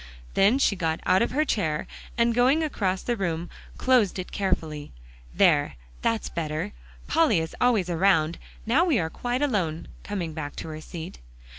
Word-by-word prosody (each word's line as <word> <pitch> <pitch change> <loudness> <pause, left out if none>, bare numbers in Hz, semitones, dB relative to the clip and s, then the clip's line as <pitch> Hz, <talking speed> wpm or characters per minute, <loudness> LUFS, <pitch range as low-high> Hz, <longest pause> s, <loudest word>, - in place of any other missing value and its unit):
Then 205 +7 +4
she 245 -7 +2
got 165 -3 -1
out 185 - +4
of 235 - +2
her 300 +4 +1
chair, 160 - -1 0.3
and 235 0 +3
going 260 +7 +3
across 190 -11 -1
the 240 - 0
room, 170 -4 -3 0.3
closed 245 -8 +3
it 185 - -5
carefully. 160 -6 -2 0.4
"There, - - +3 0.3
that's 230 -1 0
better; 160 +4 -3 0.3
Polly 315 - +3
is 160 0 -4
always 230 -7 +3
around. 170 -2 +2 0.3
Now 260 +10 +4
we 330 -8 +2
are 160 -4 -1
quite 245 +7 -2
alone," 180 - -1 0.2
coming 180 -6 -4
back 145 -2 -5
to - - -6
her 155 0 -7
seat. 160 - -8
190 Hz, 165 wpm, -26 LUFS, 160-240 Hz, 0.4 s, Then